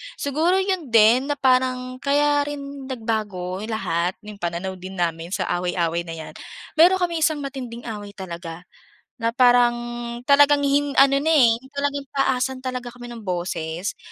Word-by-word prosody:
Siguro 315 Hz, +6 st, +1 dB
'yon 375 Hz, -6 st, -2 dB
din 230 Hz, +3 st, +5 dB
na 290 Hz, -, 0 dB
parang 255 Hz, -1 st, +1 dB
kaya 290 Hz, +1 st, +2 dB
rin 280 Hz, -2 st, -7 dB
nagbago 215 Hz, -7 st, -3 dB
lahat 180 Hz, -5 st, -1 dB
'yong 210 Hz, -1 st, -10 dB
pananaw 175 Hz, +2 st, -4 dB
din 185 Hz, +1 st, -8 dB
namin 165 Hz, -2 st, -2 dB
sa -, -, -1 dB, 0.2 s
away-away 170 Hz, -1 st, -1 dB
na 165 Hz, -, -5 dB
'yan. 160 Hz, -1 st, -9 dB, 0.5 s
Mayroon 365 Hz, +3 st, +6 dB
kaming 340 Hz, -2 st, -1 dB
isang 310 Hz, -2 st, +1 dB
matinding 250 Hz, -4 st, -6 dB
away 205 Hz, -3 st, -7 dB
talaga 170 Hz, -2 st, -7 dB, 0.5 s
na 230 Hz, -1 st, -1 dB
parang 245 Hz, -1 st, +5 dB, 0.6 s
talagang 290 Hz, 0 st, +6 dB
hin 285 Hz, 0 st, +1 dB
ano 275 Hz, 0 st, +5 dB
na, 280 Hz, -, -2 dB
eh, 260 Hz, -7 st, +6 dB, 0.2 s
talagang 285 Hz, 0 st, -2 dB
taasan 265 Hz, -1 st, 0 dB
talaga 250 Hz, -2 st, -5 dB
kami 245 Hz, 0 st, -10 dB
ng 230 Hz, -3 st, -9 dB
boses, 175 Hz, 0 st, -3 dB
245 Hz, 155 wpm, -23 LUFS, 190-280 Hz, 0.6 s, Mayroon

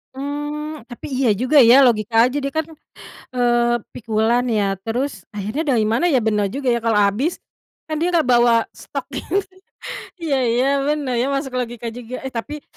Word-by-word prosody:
Mmm. 295 Hz, +1 st, -5 dB
Tapi 240 Hz, -, -8 dB
iya 255 Hz, -2 st, +1 dB
juga 255 Hz, +7 st, +4 dB
ya, 240 Hz, +4 st, +7 dB
logika 225 Hz, 0 st, +3 dB
aja 270 Hz, +3 st, -3 dB
deh, 275 Hz, -, -2 dB
kan, 315 Hz, -1 st, -1 dB, 0.7 s
eee, 240 Hz, -1 st, +2 dB, 0.2 s
pikulan 225 Hz, +2 st, 0 dB
ya, 205 Hz, -4 st, 0 dB
terus 225 Hz, -4 st, -3 dB
akhirnya 215 Hz, +10 st, -3 dB
dari 220 Hz, -2 st, +2 dB
mana 235 Hz, +10 st, +1 dB
ya, 255 Hz, -3 st, +3 dB
benar 210 Hz, -2 st, +1 dB
juga 270 Hz, -2 st, -1 dB
ya 235 Hz, -, +3 dB
kalau 225 Hz, -2 st, +2 dB
abis, 260 Hz, -, -1 dB, 0.5 s
kan 310 Hz, -, -2 dB
dia 350 Hz, +3 st, 0 dB
gak 320 Hz, -7 st, +2 dB
bawa 240 Hz, -1 st, +5 dB
stok -, -, -7 dB
gitu. 400 Hz, -, -1 dB, 0.8 s
iya 285 Hz, -5 st, +1 dB
iya 240 Hz, +3 st, +2 dB, 0.2 s
benar 285 Hz, -5 st, -1 dB
ya, 250 Hz, -, +1 dB
masuk 275 Hz, -1 st, -2 dB
logika 240 Hz, -1 st, -4 dB
juga. 245 Hz, +2 st, -8 dB
Eh, 265 Hz, -, -5 dB
tapi 285 Hz, +6 st, -6 dB
245 Hz, 175 wpm, -20 LUFS, 230-285 Hz, 0.8 s, ya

